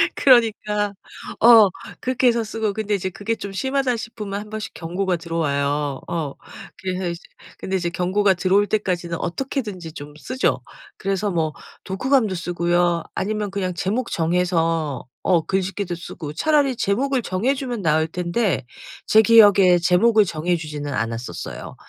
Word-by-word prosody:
그러니까 210 -5 +3 0.5
어 225 -3 +8 0.3
그렇게 255 0 +1
해서 235 -1 +3
쓰고 220 -1 -2
근데 215 0 -1
이제 190 -1 -2
그게 210 +5 -3
좀 200 -2 -7
심하다 265 +2 0
싶으면 215 -3 -5
1 210 +1 -9
번씩 215 0 -6
경고가 180 +2 -2
들어와요. 145 -4 -1
어 155 -5 -3 0.5
그래서 185 -1 -2
이제 170 - -5 0.4
근데 190 - -3
이제 175 -2 0
경고가 190 +3 +2
들어올 195 +3 +2
때까지는 180 -5 -1
어떻게든지 195 - -4
좀 145 -2 -9
쓰죠. 255 - -1 0.4
그래서 195 +1 -1
뭐 160 -3 -1 0.3
독후감도 220 +1 +1
쓰고요. 175 -1 0
아니면 210 0 -2
그냥 190 -2 -2
제목 210 +8 -2
정해서 165 -4 0 0.2
어 175 -3 +3
글짓기도 190 -1 -2
쓰고 155 -3 -8
차라리 285 - +2
제목을 255 +5 0
정해 215 +7 0
주면 250 -5 -4
나을 160 -1 +2
텐데 170 - -1 0.4
제 220 - +6
기억에 205 -5 +6
제목을 210 +5 +4
정해 170 0 -1
주지는 150 -3 -5
않았었어요. 115 +2 -5
190 Hz, 330 characters per minute, -22 LUFS, 170-220 Hz, 0.5 s, 어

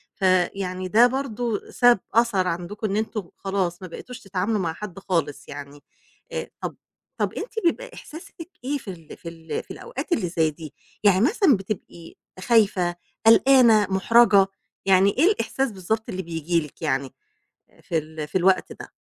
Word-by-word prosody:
فيعني 185 0 0
ده 230 +6 +6
برضه 245 -4 -3
ساب 245 -4 +5
أثر 225 -5 +3
عندكم 180 +5 -3
إن 200 - -2
أنتم 215 -4 -3
خلاص 190 -2 -2
ما 185 - -7
بقيتوش 250 +8 -9
تتعاملوا 195 +2 -1
مع 165 -3 -1
حد 195 0 -8
خالص 165 -7 -2
يعني، 145 0 -9 0.5
آآ، 480 -1 -4
طَب - - -4 0.4
طَب - - 0
أنتِ - - -6
بيبقى - - 0
إحساسِك 330 +1 -11
إيه 285 +2 -1
في 235 - -15
ال 165 -3 -12
في 170 - -8
ال 165 -1 -6
في - - -13
الأوقات 475 -6 -7
اللي 185 - +1
زي 160 -2 +1
دي؟ 155 -1 -10 0.3
يعني 200 -1 +5
مثلًا 310 - +4
بتبقي 190 -4 -7 0.2
خايفة؟ 195 -6 +2 0.3
قلقانة؟ 230 -3 +6
مُحْرجة؟ 200 0 +5 0.4
يعني 195 +1 +5
إيه 295 - +4
الإحساس 270 - -1
بالضبط 215 +4 -3
اللي 190 -2 -3
بييجي 165 0 -1
لِك 145 - -23
يعني 135 -3 -1 0.7
في 165 - -1
ال 155 0 -6
في 190 - 0
الوقت 185 +1 +2
ده؟ - - -11
195 Hz, 160 wpm, -24 LUFS, 175-230 Hz, 0.7 s, ده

